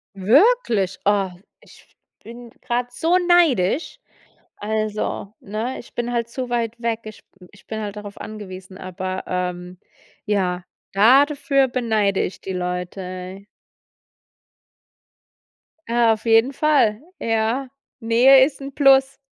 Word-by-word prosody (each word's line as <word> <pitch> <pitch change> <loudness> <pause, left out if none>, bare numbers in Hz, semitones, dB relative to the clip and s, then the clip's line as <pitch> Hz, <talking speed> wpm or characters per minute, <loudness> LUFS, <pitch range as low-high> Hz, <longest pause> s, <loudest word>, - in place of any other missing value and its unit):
Wirklich? 220 - +3
Oh, 200 -1 +2 0.3
ich - - -19 0.4
bin 235 +1 -11
grade 245 0 -2
so 330 +8 +1
neidisch. 335 - +2 0.6
Also, 215 -1 -3
ne, 220 +6 -4
ich - - -17
bin 240 0 -3
halt 235 -1 -1
zu 250 +1 -5
weit 235 -1 -2
weg. 230 -1 -1
Ich 215 -1 -11
b 180 - -15
ich 205 - -21
bin 220 0 -5
halt 205 -1 -5
darauf 205 -1 -9
angewiesen, 190 -3 -9
aber, 185 +1 -5
ähm, 180 0 -4 0.5
ja, 185 -4 -1 0.3
da 245 +8 +6
dafür 280 -2 +1
beneide 220 -6 0
ich 185 - -5
die 190 - -6
Leute. 180 +1 -5 2.4
Ah, 235 -1 +3
auf 220 +1 -8
jeden 225 +4 +4
Fall, 265 -8 +2 0.2
ja. 225 +4 -1 0.3
Nähe 255 +3 +6
ist 285 0 -7
'n 275 0 -7
Plus. 270 -1 +4
220 Hz, 125 wpm, -21 LUFS, 195-255 Hz, 2.4 s, da